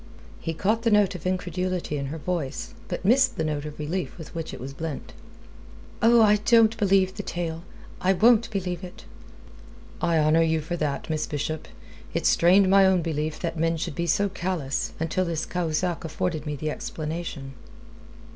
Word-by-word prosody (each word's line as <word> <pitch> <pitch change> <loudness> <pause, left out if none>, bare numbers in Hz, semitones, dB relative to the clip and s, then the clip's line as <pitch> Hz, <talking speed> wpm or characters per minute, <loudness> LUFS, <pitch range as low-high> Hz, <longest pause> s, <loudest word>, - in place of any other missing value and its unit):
He 165 - -4
caught 215 +7 +1
the 230 - +2
note 205 -2 +4
of 180 -1 -5
incredulity 180 -2 -2
in 140 -1 -3
her 155 +4 -5
voice, 160 - -3
but - - -5
missed 255 +3 +4
the 160 - 0
note 150 -1 -2
of 150 -1 -7
relief 165 +5 -3
with 160 -3 -10
which 165 -1 -5
it - - -8
was 135 +2 -7
blent. 160 +1 -6 0.9
"Oh, 230 0 +6
I 210 0 +5
don't 225 +1 +4
believe 195 -3 +3
the 205 - -5
tale. 170 -3 -4 0.4
I 190 +1 +3
won't 230 +3 +4
believe 185 -3 -3
it!" 180 - -10 1.0
"I 170 -1 +2
honour 155 +1 +4
you 160 -1 +2
for 160 +3 -4
that, 150 -4 -2
Miss 155 -2 -1
Bishop. 155 +1 -3 0.5
It - - -1
strained 185 +3 +5
my 195 +1 +6
own 190 -2 +4
belief 155 -1 -2
that 170 -2 -3
men 165 0 +1
should 165 0 -3
be 170 +3 -2
so 200 +5 +2
callous, 175 -8 -2
until 165 +3 0
this 165 -2 -2
Cahusac 175 0 -1
afforded 160 -1 -3
me 150 - -2
the 155 +2 -3
explanation." 155 -4 -5
170 Hz, 180 wpm, -25 LUFS, 155-190 Hz, 1.0 s, Oh